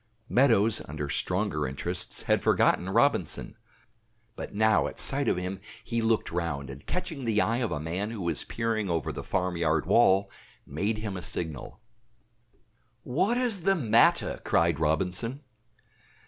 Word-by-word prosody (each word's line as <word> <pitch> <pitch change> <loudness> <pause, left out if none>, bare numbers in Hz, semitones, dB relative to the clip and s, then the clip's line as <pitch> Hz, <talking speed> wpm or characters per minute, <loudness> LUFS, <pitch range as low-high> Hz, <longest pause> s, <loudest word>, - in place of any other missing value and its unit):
Meadows, 115 -4 +4
under 75 -1 -4
stronger 90 -2 -1
interests, 85 +7 -4
had - - +2
forgotten 90 - +2
Robinson; 115 - +1 0.8
but - - -7
now 110 +1 +3
at - - -8
sight 140 +1 +1
of - - +2
him 90 +1 -4 0.2
he 115 -1 -2
looked 110 -1 +1
round, 75 -5 -3
and 70 +1 -12
catching 160 -6 -4
the 110 -3 +1
eye 115 +2 +1
of 120 -4 -1
a 75 - -2
man 90 +7 -3
who 115 -3 -6
was 85 - -1
peering 115 -3 -2
over 80 -4 -1
the - - -6
farmyard 85 -4 0
wall, 95 0 +4 0.3
made 100 +10 -2
him 105 -2 -4
a 90 - -5
signal. 80 0 -4 1.2
"What 195 - +1
is 240 -7 0
the 195 +3 +3
matter?" 115 - +3
cried 85 -2 +2
Robinson. 90 - -1
100 Hz, 145 wpm, -28 LUFS, 85-115 Hz, 1.2 s, Meadows